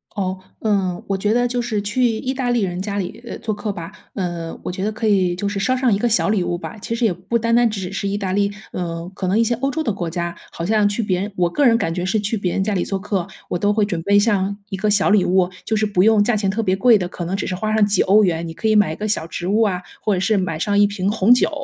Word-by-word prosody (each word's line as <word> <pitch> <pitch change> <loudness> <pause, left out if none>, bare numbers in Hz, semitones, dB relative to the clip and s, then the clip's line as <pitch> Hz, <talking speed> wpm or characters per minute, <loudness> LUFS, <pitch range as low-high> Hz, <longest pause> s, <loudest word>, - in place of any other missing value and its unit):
哦。 185 -2 -2 0.2
嗯， 195 -5 0
我 195 - 0
觉 205 +2 +1
得 245 +1 +2
就 245 0 -1
是 220 -4 -2
去 210 +5 -1
意 240 +2 0
大 255 -2 -2
利 240 -2 +2
人 180 -1 -2
家 200 +1 -3
里， 195 +3 -4
呃， - - -6
做 220 -2 -3
客 205 +1 -3
吧， 170 -2 -7 0.2
嗯， 175 -4 -4
我 - - -3
觉 185 +1 -4
得 215 - 0
可 215 +1 -2
以 185 -4 +2
就 200 +3 -3
是 200 0 -2
捎 255 +6 +1
上 250 -3 +2
一 - - +2
个 240 - +1
小 230 - +2
礼 205 -3 +2
物 175 0 -2
吧。 180 - -7
其 230 - -3
实 235 0 0
也 210 - +2
不 185 +7 -2
单 230 +1 0
单 240 -1 +4
只 195 -4 -4
是 200 - -2
意 200 +1 -1
大 190 -2 -2
利， 200 +1 +1 0.2
呃， 170 -1 -4
可 190 -1 -4
能 195 +4 +2
一 - - +5
些 230 - +1
欧 270 +4 -1
洲 315 +3 -2
的 225 - 0
国 175 -4 -3
家， 170 0 -3 0.2
好 170 - -5
像 210 +1 +3
去 205 +3 -1
别 185 -3 0
人 205 +2 -4
我 175 - +3
个 285 +11 +1
人 230 -2 +5
感 165 -7 -1
觉 180 +1 -3
是 190 +4 +1
去 210 +2 -1
别 185 -4 -2
人 190 - 0
家 210 +1 -1
里 180 - 0
做 195 -1 -2
客， 190 -3 -2 0.2
我 - - -1
都 205 +3 +1
会 210 -1 +2
准 175 -5 -3
备 200 +4 +3
像 200 -2 +1
一 195 - -3
个 210 +3 0
小 200 -1 +3
礼 210 -3 +5
物。 185 0 +2
就 220 - -1
是 215 - +2
不 200 -3 +1
用 215 -1 +5
价 240 0 +1
钱 200 -2 0
特 220 +4 -1
别 185 -2 +2
贵 230 +3 +5
的， 180 -3 -2
可 175 - -7
能 185 +3 -2
只 195 - -3
是 - - -2
花 215 +3 -2
上 215 -1 +4
几 205 -2 +2
欧 210 +3 +5
元， 170 -2 0
你 165 - -6
可 220 - -2
以 215 - +3
买 205 -6 +4
一 - - -4
个 215 - -4
小 205 -6 -1
植 175 +1 -5
物 210 +4 +2
啊， 185 -4 +1 0.2
或 210 - +2
者 185 - 0
是 200 +3 +2
买 185 -4 -1
上 205 +3 0
一 205 0 +6
瓶 200 -1 -2
红 215 +2 +5
酒， 250 - +3
200 Hz, 340 characters per minute, -20 LUFS, 185-220 Hz, 0.2 s, 一